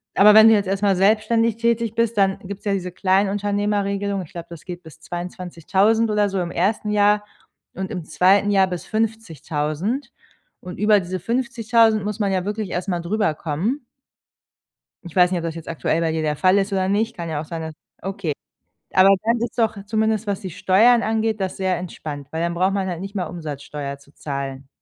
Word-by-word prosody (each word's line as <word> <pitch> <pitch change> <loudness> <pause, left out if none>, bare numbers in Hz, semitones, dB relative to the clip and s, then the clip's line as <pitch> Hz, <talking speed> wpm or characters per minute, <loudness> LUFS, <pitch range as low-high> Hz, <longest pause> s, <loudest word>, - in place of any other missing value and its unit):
Aber 210 +1 +7
wenn 220 +1 +9
du 225 - +6
jetzt 205 -1 +1
erst 195 +1 -1
mal 200 -2 +3
selbstständig 220 +3 +2
tätig 230 -1 0
bist, 230 -1 0
dann 195 -1 +2
gibt 195 +1 -8
es - - -26
ja 200 - +1
diese 185 -2 -3
Kleinunternehmerregelung. 200 +1 0
Ich 155 - -15
glaube, 170 -1 -8
das 170 -2 -11
geht 180 -1 -7
bis 160 -1 -14
22000 180 +5 0
oder 210 -1 +2
so 195 -2 -2
im 170 - -3
ersten 205 +5 0
Jahr 210 0 +3 0.5
und 190 0 -4
im 180 - -4
zweiten 185 +6 +3
Jahr 195 -1 +4
bis 180 -2 -5
50000. 215 - -2 0.5
Und 180 -1 -9
über 210 0 +5
diese 185 +1 -4
50000 230 0 +2
muss 210 +1 -4
man 200 -2 +1
ja 185 -1 -1
wirklich 210 -2 -3
erst 180 +2 -3
mal 175 -2 0
drüberkommen. 175 - -1 1.2
Ich 175 -1 -11
weiß 180 -1 +5
nicht, 185 - 0
ob 170 - -5
das 165 -1 -3
jetzt 165 -1 -9
aktuell 165 0 -1
bei 165 -1 0
dir 160 - -1
der 150 -1 -1
Fall 185 +3 +4
ist 200 +1 -1
oder 190 -1 +1
nicht, 220 +4 0
kann 170 -1 -5
ja 150 -2 -2
auch - - -6
sein, 165 0 -5
dass 160 -1 -6 0.3
okay. 195 -4 -3 0.6
Aber 190 +1 +6
dann 230 +2 +2
ist 235 - -4
doch, 225 -2 +1
zumindest 220 0 0
was 200 -2 -1
die 190 - -5
Steuern 225 +8 +4
angeht, 220 0 0
das 190 -1 -3
sehr 185 -2 0
entspannt, 155 -5 -7
weil 160 - -3
dann 170 0 0
braucht 185 +3 +1
man 195 -1 -1
halt 175 -1 -4
nicht 195 +2 -7
mal 185 -3 -1
Umsatzsteuer 145 -3 -6
zu 140 +1 -22
zahlen. 135 -2 -5
195 Hz, 205 wpm, -22 LUFS, 170-210 Hz, 1.2 s, wenn